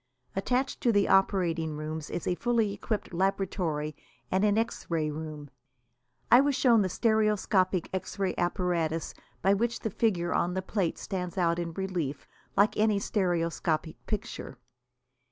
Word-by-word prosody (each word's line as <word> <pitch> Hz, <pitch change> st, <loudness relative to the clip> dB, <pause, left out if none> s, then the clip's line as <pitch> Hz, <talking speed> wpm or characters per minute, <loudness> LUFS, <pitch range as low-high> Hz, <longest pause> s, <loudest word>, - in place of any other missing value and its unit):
Attached 250 Hz, +7 st, 0 dB
to 240 Hz, -, +3 dB
the 205 Hz, -2 st, +3 dB
operating 170 Hz, -5 st, +2 dB
rooms 155 Hz, 0 st, -5 dB
is 170 Hz, -, -4 dB
a -, -, +1 dB
fully 225 Hz, 0 st, +1 dB
equipped 205 Hz, -1 st, -3 dB
laboratory 175 Hz, -5 st, -1 dB, 0.4 s
and 190 Hz, +2 st, +2 dB
an 210 Hz, 0 st, +3 dB
X 225 Hz, +1 st, -2 dB
ray 155 Hz, -3 st, 0 dB
room. 150 Hz, -2 st, -7 dB, 0.8 s
I 245 Hz, -, +9 dB
was 285 Hz, -1 st, +1 dB
shown 235 Hz, -5 st, +5 dB
the 190 Hz, -, +1 dB
stereoscopic 210 Hz, -4 st, +2 dB
X 190 Hz, -, -4 dB
ray 195 Hz, -2 st, 0 dB
apparatus 175 Hz, -3 st, -1 dB, 0.3 s
by 195 Hz, +2 st, +5 dB
which 235 Hz, +3 st, 0 dB
the 220 Hz, -, -2 dB
figure 185 Hz, -6 st, +1 dB
on 180 Hz, +1 st, +1 dB
the 190 Hz, -, -1 dB
plate 190 Hz, -3 st, -1 dB
stands 180 Hz, -2 st, -4 dB
out 170 Hz, -1 st, +2 dB
in 170 Hz, -1 st, -3 dB
relief, 175 Hz, -7 st, -3 dB, 0.3 s
like 205 Hz, +2 st, +4 dB
any 215 Hz, -1 st, +3 dB
stereoscopic 170 Hz, -5 st, -1 dB
picture. 205 Hz, -, -4 dB
185 Hz, 150 wpm, -29 LUFS, 165-210 Hz, 0.8 s, I